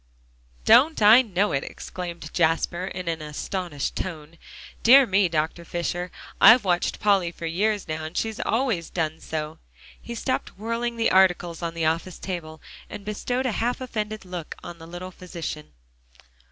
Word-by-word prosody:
"Don't 310 +5 +6
I 220 +5 +9
know 205 -3 0
it?" 135 - 0
exclaimed 170 -3 -7
Jasper, 170 +2 +1
in 185 -2 -6
an 165 -1 -2
astonished 150 0 -4
tone. 165 -2 -6 0.4
"Dear 265 +3 +8
me, 195 -4 +2
Dr. 160 +1 -1
Fisher, 175 +1 -3 0.3
I've 235 -1 +8
watched 175 -2 0
Polly 195 -5 +2
for 170 - -8
years 205 +5 0
now. 155 0 -4
And 160 +3 -7
she's 220 -1 -2
always 225 -8 0
done 160 -2 -2
so." 155 0 -5 0.4
He 235 - -7
stopped 255 -1 -3
whirling 230 +2 -2
the 230 - +2
articles 180 -3 +3
on 170 -1 -3
the 165 -1 -1
office 165 +3 -1
table, 160 -4 -6 0.3
and 200 - -8
bestowed 245 +5 -2
a 255 - +1
half 235 +3 -1
offended 215 -5 -4
look 180 -3 -6
on 170 -1 -9
the 165 - -11
little 175 +2 -7
physician. 170 - -7
180 Hz, 160 wpm, -25 LUFS, 165-215 Hz, 0.4 s, I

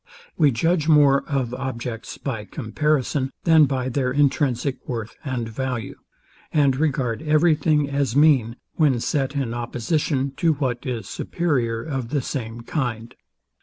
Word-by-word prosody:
We 150 -4 +4
judge 155 +6 +1
more, 145 -3 +5
of 130 -4 -1
objects 125 -3 -5
by 115 -6 -4
comparison, 135 +4 -1
than 160 -2 +6
by 130 -2 -2
their 130 0 0
intrinsic 140 -2 +1
worth 115 -3 -4
and 130 -5 -3
value; 120 -2 -4 0.6
and 140 -4 +3
regard 130 -5 0
every 155 +2 +4
thing 150 -1 +1
as 140 -3 -1
mean, 140 -6 +4 0.2
when 145 -6 +3
set 135 +3 -1
in 130 -5 -1
opposition 130 +4 -1
to 165 -3 +3
what 130 -5 -3
is 115 -6 -3
superior 120 -11 -1
of 135 -5 -4
the 140 -1 -1
same 115 -3 -5
kind. 120 -3 -3
135 Hz, 140 wpm, -23 LUFS, 120-150 Hz, 0.6 s, than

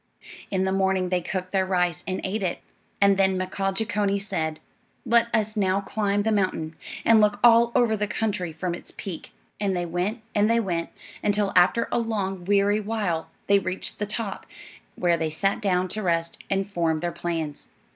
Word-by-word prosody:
In 190 -1 0
the 190 - 0
morning 190 -1 +1
they 180 -1 +1
cooked 185 +1 -4
their 190 -1 +2
rice 180 -3 0
and 185 0 -2
ate 200 +3 -2
it, 180 -3 -1 0.4
and 200 -1 +5
then 190 -1 +3
Mkaaah 190 +1 -2
Jeechonee 205 -2 0
said: 160 -6 -3 0.5
"Let 235 0 +4
us 215 -1 0
now 195 -2 +2
climb 205 0 0
the 220 - +1
mountain, 185 -6 0 0.3
and 225 -1 +6
look 205 -1 +2
all 235 0 +6
over 240 -4 +4
the 210 0 -1
country 205 -5 -2
from 170 +3 -3
its 175 - -9
peak." 180 -5 -7 0.3
And 195 -3 0
they 175 - -1
went 180 +7 -2
and 210 +1 +3
they 230 0 +4
went, 175 -6 -2 0.3
until 205 -1 +1
after 185 +6 +4
a - - +2
long, 195 -5 -2
weary 205 +1 +3
while, 205 -6 -2 0.2
they 200 0 +5
reached 185 0 -4
the 210 - -1
top, 215 -1 -4 0.5
where 175 -1 +2
they 160 -1 -1
sat 195 +6 0
down 185 -2 +1
to 215 - -3
rest 170 -3 0
and 195 0 0
form 170 -5 0
their 175 +2 -2
plans. 165 -5 -4
195 Hz, 185 wpm, -25 LUFS, 180-210 Hz, 0.5 s, and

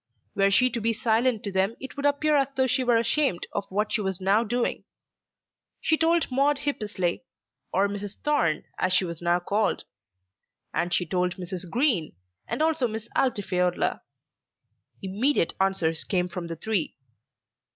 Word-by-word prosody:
Were 195 0 +3
she 250 +6 +4
to 235 - -3
be 230 +1 +2
silent 230 0 +1
to 200 - -3
them 190 +4 +1
it 265 - -8
would 285 0 +1
appear 300 +1 +2
as 275 -2 +3
though 260 - +2
she 260 +1 +1
were 240 -2 +3
ashamed 235 - +1
of 200 - -3
what 210 +3 -1
she 220 - +1
was 190 -2 -2
now 195 +4 +3
doing. 240 +2 -1 1.0
She 320 - +2
told 330 -1 +1
Maude 280 +3 +2
Hippesley, 210 -11 -2 0.5
or 200 +1 +2
Mrs. 205 0 -5
Thorne 170 - +1 0.2
as 185 - +2
she 185 - +4
was 170 -1 -6
now 175 +1 +2
called; 205 +4 0 0.9
and 175 +1 -1
she 180 - +1
told 180 +2 -1
Mrs. 180 -1 -5
Green, 225 - +1 0.3
and 310 - -1
also 315 -6 +1
Miss 220 0 -6
Altifiorla. 185 -8 0 1.0
Immediate 205 - +1
answers 170 -5 +3
came 180 -2 0
from 180 -1 -6
the 165 - -5
three. 185 0 -1
205 Hz, 160 wpm, -26 LUFS, 180-255 Hz, 1.0 s, she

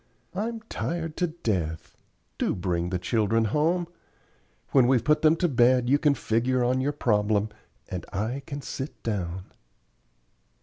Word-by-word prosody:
I'm 225 +4 -3
tired 165 -7 -4
to 180 - +1
death. 95 - -3 0.4
Do - - +1
bring 90 -1 -1
the 90 - -1
children 110 +4 +1
home. 165 - +1 0.8
When 130 -3 +5
we've 125 -3 +3
put 150 +3 +3
them 155 0 +5
to 175 +1 +1
bed 125 -2 +3
you 145 - +5
can 150 -3 +3
figure 125 +2 +1
on 130 +2 +2
your 140 +2 +1
problem, 105 -6 +1 0.4
and 90 -1 -5
I 110 +7 -2
can 140 0 -5
sit 135 +3 -6
down." 95 -4 -3
125 Hz, 145 wpm, -26 LUFS, 105-150 Hz, 0.8 s, When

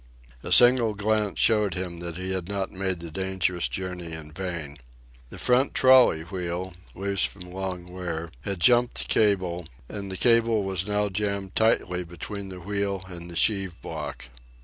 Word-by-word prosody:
A - - -6
single 120 -3 +6
glance 105 0 0
showed 105 -5 +3
him 90 -2 -4
that 85 -1 -5
he 95 +1 -3
had 95 -1 -2
not 100 -1 -2
made 95 -2 -2
the 85 -1 -8
dangerous 95 -4 0
journey 90 +4 -5
in 80 -1 -7
vain. 85 -5 -5 0.5
The - - -10
front 125 +3 +2
trolley 130 -11 +6
wheel, 90 +1 -4 0.2
loose 100 0 0
from 100 - -3
long 95 -1 -4
wear, 85 -2 -5
had 100 +3 -3
jumped 120 +4 +4
the - - -1
cable, 90 -5 +1 0.2
and 100 -1 -6
the 95 - -4
cable 115 -2 +3
was 95 0 -1
now 105 0 +1
jammed 100 -1 -2
tightly 90 -5 +2
between 95 +4 -7
the 90 -1 -8
wheel 100 0 -2
and 85 -1 -7
the 85 - -8
sheave 95 -2 +2
block. 75 -6 -6
95 Hz, 170 wpm, -26 LUFS, 85-105 Hz, 0.5 s, single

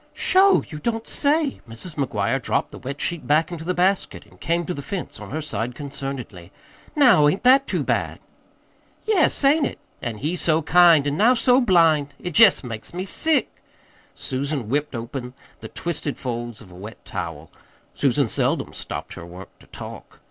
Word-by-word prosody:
"Sho! 390 +1 +4
you 150 - -8
don't 225 +6 -2
say!" 295 0 0
Mrs. 115 +10 -7
McGuire 130 -2 -1
dropped - - -1
the - - -10
wet 135 +2 -6
sheet 170 -2 -2
back 155 +4 +2
into 165 -2 -6
the 180 +2 -2
basket 190 +2 0
and - - -22
came 170 +1 0
to 180 - -3
the 140 - -6
fence 185 +4 -6
on - - -9
her 155 +2 -4
side 120 -3 -4
concernedly. 135 - -7 0.4
"Now, 245 - +6
ain't 170 +7 0
that 265 +2 +5
too - - -1
bad?" - - -1 0.9
"Yes, 395 -9 +2
ain't 290 +2 +4
it? - - -8 0.2
An' 115 -4 -4
he 155 +10 -2
so 160 -2 +1
kind, 165 -2 +5
an' 145 +1 -1
now 235 +6 +5
so 250 +2 +4
blind! 165 - +3
It 180 - -5
jest 215 -3 +6
makes 115 +5 -7
me 185 +1 -3
sick." 315 +10 +2 0.5
Susan 135 -3 -3
whipped 145 +1 -1
open 125 +2 -6 0.2
the - - -8
twisted 165 -4 -4
folds 120 -3 -5
of 95 -4 -15
a - - -13
wet 105 +5 -11
towel. 80 -2 -6 0.4
Susan - - +1
seldom - - -1
stopped - - -4
her - - -9
work 90 +2 -11
to - - -19
talk. - - -10
150 Hz, 180 wpm, -22 LUFS, 125-190 Hz, 0.9 s, Now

